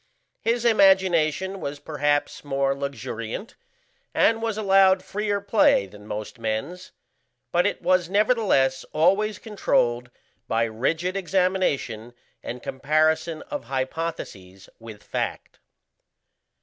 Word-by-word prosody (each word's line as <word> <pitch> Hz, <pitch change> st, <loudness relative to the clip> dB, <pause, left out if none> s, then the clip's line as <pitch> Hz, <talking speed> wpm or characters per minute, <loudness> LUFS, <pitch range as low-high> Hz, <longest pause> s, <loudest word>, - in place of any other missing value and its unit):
His 235 Hz, +1 st, 0 dB
imagination 190 Hz, -4 st, +3 dB
was 140 Hz, 0 st, -4 dB
perhaps 145 Hz, 0 st, -1 dB
more 135 Hz, -1 st, 0 dB
luxuriant 140 Hz, -, -5 dB, 0.6 s
and 225 Hz, 0 st, +3 dB
was 225 Hz, -2 st, -2 dB
allowed 195 Hz, -2 st, +4 dB
freer 205 Hz, 0 st, -2 dB
play 200 Hz, -, +3 dB
than 105 Hz, +2 st, -14 dB
most 110 Hz, +3 st, -6 dB
men's, 115 Hz, +12 st, -4 dB, 0.6 s
but 175 Hz, +1 st, +3 dB
it -, -, -4 dB
was 185 Hz, -2 st, +2 dB
nevertheless 200 Hz, -, +2 dB
always 195 Hz, +6 st, +2 dB
controlled 125 Hz, -, 0 dB, 0.4 s
by 115 Hz, +1 st, +1 dB
rigid 155 Hz, -, -1 dB
examination 180 Hz, -, -1 dB, 0.3 s
and 125 Hz, +1 st, -7 dB
comparison 155 Hz, +3 st, 0 dB
of 290 Hz, -, -6 dB
hypotheses 130 Hz, -, -5 dB
with 110 Hz, -2 st, -11 dB
fact. -, -, -4 dB
160 Hz, 105 wpm, -24 LUFS, 130-195 Hz, 0.6 s, allowed